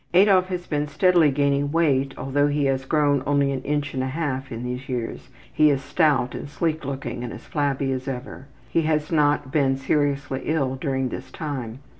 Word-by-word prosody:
Adolf 185 Hz, -1 st, +5 dB
has 180 Hz, -1 st, -4 dB
been 150 Hz, -1 st, -1 dB
steadily 175 Hz, 0 st, +4 dB
gaining 140 Hz, 0 st, +1 dB
weight, 140 Hz, -5 st, +2 dB
although 145 Hz, +2 st, +1 dB
he 145 Hz, 0 st, 0 dB
has 135 Hz, -1 st, 0 dB
grown 145 Hz, -1 st, +2 dB
only 140 Hz, -1 st, +2 dB
an 135 Hz, -1 st, -3 dB
inch 145 Hz, +1 st, -2 dB
and 130 Hz, -, -1 dB
a 130 Hz, -, -1 dB
half 135 Hz, -2 st, -3 dB
in 115 Hz, +1 st, -5 dB
these 125 Hz, +2 st, -5 dB
years. 120 Hz, -3 st, -4 dB, 0.2 s
He 155 Hz, 0 st, +5 dB
is 140 Hz, -2 st, 0 dB
stout 150 Hz, -7 st, +2 dB
and 145 Hz, -, -6 dB
sleek 160 Hz, +1 st, -1 dB
looking 135 Hz, -3 st, -4 dB
and 120 Hz, -, -5 dB
as -, -, -10 dB
flabby 140 Hz, -2 st, -1 dB
as 130 Hz, 0 st, -3 dB
ever. 130 Hz, +1 st, -6 dB, 0.2 s
He 165 Hz, -, +1 dB
has 155 Hz, 0 st, 0 dB
not 145 Hz, -4 st, +2 dB
been 135 Hz, -3 st, +2 dB
seriously 140 Hz, -1 st, 0 dB
ill 145 Hz, -5 st, 0 dB
during 130 Hz, -1 st, -1 dB
this 130 Hz, +2 st, -7 dB
time. 130 Hz, -5 st, -5 dB
140 Hz, 195 wpm, -24 LUFS, 130-150 Hz, 0.2 s, Adolf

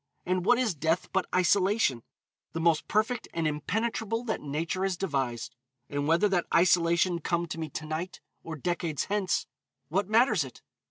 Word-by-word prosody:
And 185 Hz, 0 st, 0 dB
what 245 Hz, -, +6 dB
is 240 Hz, -6 st, +1 dB
death 160 Hz, +3 st, -1 dB
but 190 Hz, -1 st, +1 dB
isolation? 185 Hz, -, +3 dB, 0.5 s
The 165 Hz, -, -2 dB
most 165 Hz, -2 st, +2 dB
perfect 220 Hz, +4 st, 0 dB
and 165 Hz, -2 st, +1 dB
impenetrable 220 Hz, -, -1 dB
that 225 Hz, -3 st, -2 dB
Nature 160 Hz, +5 st, -2 dB
has 190 Hz, -2 st, 0 dB
devised. 135 Hz, -10 st, -2 dB, 0.4 s
And 145 Hz, 0 st, -1 dB
whether 170 Hz, +6 st, +4 dB
that 180 Hz, -3 st, +1 dB
isolation 170 Hz, 0 st, +3 dB
come 170 Hz, +1 st, -1 dB
to 165 Hz, -, -5 dB
me 160 Hz, -1 st, -4 dB
to 155 Hz, -, -6 dB
night 160 Hz, +4 st, -4 dB, 0.2 s
or 165 Hz, -, -6 dB
decades 165 Hz, 0 st, -2 dB
hence, 200 Hz, -2 st, 0 dB, 0.4 s
what 195 Hz, +5 st, 0 dB
matters 220 Hz, -, +4 dB
it? 130 Hz, -, -12 dB
175 Hz, 165 wpm, -28 LUFS, 155-200 Hz, 0.5 s, what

